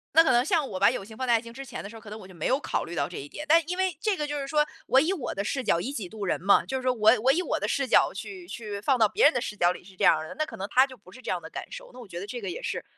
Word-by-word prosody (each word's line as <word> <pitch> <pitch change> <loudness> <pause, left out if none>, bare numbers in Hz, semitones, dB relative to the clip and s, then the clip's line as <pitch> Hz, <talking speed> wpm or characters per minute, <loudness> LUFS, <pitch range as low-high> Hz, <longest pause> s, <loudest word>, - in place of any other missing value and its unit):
那 325 - +9
可 265 - +3
能 240 0 +4
像 310 -1 +1
我 190 -5 -5
把 200 +3 +5
友 220 -6 -5
情 220 +1 -12
放 260 - -3
在 240 - +3
爱 225 - +3
情 230 0 -11
之 270 +3 -7
前 - - -7
的 200 - -7
时 225 - -12
候 - - -9
儿， - - -19
可 215 - -12
能 215 +1 -7
我 185 - -12
就 185 - -14
没 165 - -3
有 265 +3 +2
考 - - -2
虑 170 - -8
到 140 -2 0
这 - - -8
一 145 - -7
点， 300 - -7
但 330 +2 +6
因 360 - -2
为 375 -4 0
这 425 -3 +1
个 300 - -2
就 295 0 -3
是 275 - -4
说， 300 +1 +2 0.2
我 265 - +5
以 325 +7 +1
我 315 -10 -4
的 195 - -2
视 265 +5 -2
角， 170 - +2
以 245 +10 -3
己 200 -10 -5
度 215 -2 -6
人 180 - -1
嘛， 200 +2 +4
就 265 - -2
是 260 - -6
说 255 - +2
我 220 -2 +5
我 260 - +5
以 330 +6 +1
我 - - -1
的 - - -2
视 275 -2 0
角 - - +4
去 370 -3 -8
去 210 - -6
放 260 +4 +2
到 220 - +6
别 - - 0
人 295 - +7
的 245 - 0
视 220 -3 -5
角 175 -3 +3
里 - - -8
是 190 0 -16
这 - - -4
样 160 - +6
儿 155 0 -6
的， - - -9
那 310 - 0
可 - - -10
能 195 - -4
他 260 +5 +5
就 260 -2 -12
不 185 -2 -18
是 255 - -13
这 - - -7
样 180 - -2
的 160 - -10
感 - - -8
受， - - -9
那 255 - -12
我 235 - -10
觉 175 -1 -7
得 200 - -7
这 240 +3 -6
个 - - -4
也 465 +8 -5
是 - - -3
245 Hz, 435 characters per minute, -27 LUFS, 200-295 Hz, 0.2 s, 那